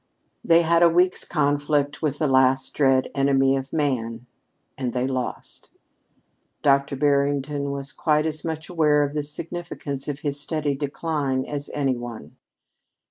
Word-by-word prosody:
They 170 Hz, 0 st, +5 dB
had 170 Hz, +1 st, +3 dB
a 170 Hz, -, +7 dB
week's 180 Hz, +2 st, +2 dB
conflict 145 Hz, -1 st, 0 dB
with 150 Hz, -3 st, -1 dB
the 155 Hz, -, 0 dB
last 130 Hz, 0 st, +3 dB
dread 135 Hz, -2 st, +2 dB
enemy 135 Hz, -1 st, +3 dB
of 135 Hz, 0 st, -4 dB
man, 125 Hz, -6 st, -1 dB, 0.5 s
and 125 Hz, -3 st, -3 dB
they 125 Hz, 0 st, 0 dB
lost. 130 Hz, -2 st, -5 dB, 0.9 s
Dr. 140 Hz, -1 st, +3 dB
Barrington 140 Hz, 0 st, +1 dB
was 140 Hz, 0 st, -4 dB
quite 150 Hz, 0 st, +1 dB
as 155 Hz, -1 st, -3 dB
much 160 Hz, 0 st, -4 dB
aware 150 Hz, -4 st, +3 dB
of 145 Hz, 0 st, -3 dB
the 150 Hz, -, -1 dB
significance 150 Hz, -2 st, -6 dB
of 145 Hz, -1 st, -4 dB
his 145 Hz, -1 st, -2 dB
steady 150 Hz, -1 st, -1 dB
decline 140 Hz, -1 st, -2 dB
as 145 Hz, -1 st, -5 dB
any 135 Hz, -3 st, +1 dB
one. 115 Hz, -11 st, -8 dB
145 Hz, 145 wpm, -24 LUFS, 135-150 Hz, 0.9 s, a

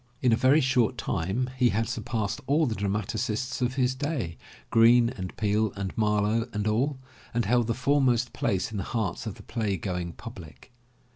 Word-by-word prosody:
In 125 Hz, -2 st, +4 dB
a -, -, +6 dB
very 135 Hz, +6 st, +4 dB
short 125 Hz, -2 st, +2 dB
time 100 Hz, +10 st, -1 dB
he 125 Hz, -1 st, +4 dB
had 110 Hz, +1 st, 0 dB
surpassed 110 Hz, -2 st, -3 dB
all 150 Hz, +4 st, +3 dB
the 120 Hz, -, -1 dB
dramatists 110 Hz, +5 st, -2 dB
of 125 Hz, +1 st, 0 dB
his 130 Hz, -1 st, +2 dB
day, 130 Hz, -, -3 dB, 0.4 s
Greene 115 Hz, +1 st, +6 dB
and 95 Hz, -7 st, -7 dB
Peele 105 Hz, 0 st, +1 dB
and 100 Hz, -1 st, -4 dB
Marlowe 105 Hz, +1 st, +1 dB
and 105 Hz, -1 st, -2 dB
all, 130 Hz, +6 st, +1 dB, 0.4 s
and 120 Hz, -, +1 dB
held 120 Hz, +2 st, +2 dB
the 115 Hz, -, 0 dB
foremost 130 Hz, -2 st, +2 dB
place 95 Hz, 0 st, -1 dB
in 110 Hz, -, -4 dB
the 95 Hz, -, -2 dB
hearts 105 Hz, -1 st, -2 dB
of 105 Hz, -, -4 dB
the -, -, -13 dB
play 110 Hz, -5 st, -2 dB
going 90 Hz, -1 st, -3 dB
public. 90 Hz, -, -11 dB
115 Hz, 185 wpm, -27 LUFS, 105-125 Hz, 0.4 s, a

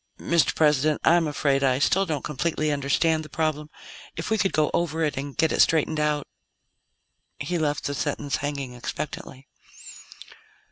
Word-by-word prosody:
"Mr. 170 Hz, -1 st, +2 dB
President, 150 Hz, -1 st, +3 dB
I'm 170 Hz, -1 st, +4 dB
afraid 140 Hz, -2 st, +1 dB
I 130 Hz, -2 st, +3 dB
still 190 Hz, +7 st, +2 dB
don't 150 Hz, -4 st, -2 dB
completely 155 Hz, +1 st, -1 dB
understand 150 Hz, +3 st, +1 dB
the 155 Hz, -, -11 dB
problem. 155 Hz, -1 st, -2 dB, 0.5 s
If 165 Hz, -, -5 dB
we 220 Hz, -, +2 dB
could 195 Hz, -, +2 dB
go 155 Hz, -1 st, +1 dB
over 165 Hz, -1 st, 0 dB
it, 150 Hz, -, 0 dB
and 140 Hz, 0 st, -6 dB
get 160 Hz, -1 st, +2 dB
it -, -, +3 dB
straightened 155 Hz, -1 st, +2 dB
out 150 Hz, -1 st, 0 dB, 0.6 s
" -, -, -49 dB, 0.3 s
He 175 Hz, -1 st, -2 dB
left 150 Hz, -2 st, -1 dB
the 145 Hz, -, -2 dB
sentence 145 Hz, -1 st, -2 dB
hanging 140 Hz, -3 st, -4 dB
expectantly. 135 Hz, +1 st, -6 dB
150 Hz, 160 wpm, -25 LUFS, 140-160 Hz, 0.6 s, I'm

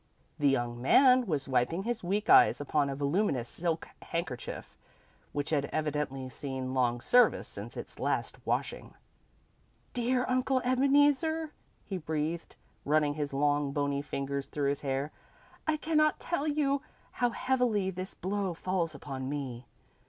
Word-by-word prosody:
The 145 Hz, -1 st, +4 dB
young 120 Hz, -3 st, -1 dB
man 255 Hz, -, +6 dB
was 150 Hz, -6 st, -1 dB
wiping 135 Hz, +8 st, +1 dB
his 235 Hz, -1 st, -3 dB
weak 200 Hz, +4 st, -1 dB
eyes -, -, +7 dB
upon 145 Hz, 0 st, +1 dB
a 135 Hz, -, -3 dB
voluminous 140 Hz, -, 0 dB
silk 165 Hz, +4 st, -2 dB
handkerchief 145 Hz, -8 st, -5 dB, 0.6 s
which 145 Hz, +2 st, -3 dB
had 145 Hz, -2 st, +2 dB
evidently 150 Hz, -4 st, -2 dB
seen 130 Hz, -1 st, -5 dB
long 120 Hz, -2 st, +1 dB
service 245 Hz, -, +4 dB
since -, -, -8 dB
its -, -, -8 dB
last -, -, -2 dB
washing. -, -, -2 dB, 1.0 s
"Dear 250 Hz, +1 st, +1 dB
Uncle 255 Hz, +1 st, +2 dB
Ebeneezer," 290 Hz, +4 st, +3 dB, 0.3 s
he 190 Hz, -2 st, -4 dB
breathed, 160 Hz, +1 st, -3 dB, 0.3 s
running 150 Hz, 0 st, +2 dB
his 145 Hz, -1 st, -3 dB
long, 145 Hz, 0 st, +1 dB
bony 140 Hz, -1 st, 0 dB
fingers 140 Hz, -1 st, -3 dB
through 145 Hz, -2 st, -1 dB
his 140 Hz, +1 st, -2 dB
hair. 140 Hz, +1 st, -2 dB, 0.6 s
"I 310 Hz, -1 st, +2 dB
cannot 305 Hz, -1 st, +2 dB
tell 310 Hz, -4 st, -2 dB
you 285 Hz, -2 st, +1 dB, 0.3 s
how 245 Hz, -, +1 dB
heavily 240 Hz, -6 st, +1 dB
this 185 Hz, +1 st, -6 dB
blow 195 Hz, -2 st, -2 dB
falls 175 Hz, -1 st, -1 dB
upon 130 Hz, -2 st, -5 dB
me. 130 Hz, -4 st, -5 dB
155 Hz, 140 wpm, -30 LUFS, -, 1.0 s, eyes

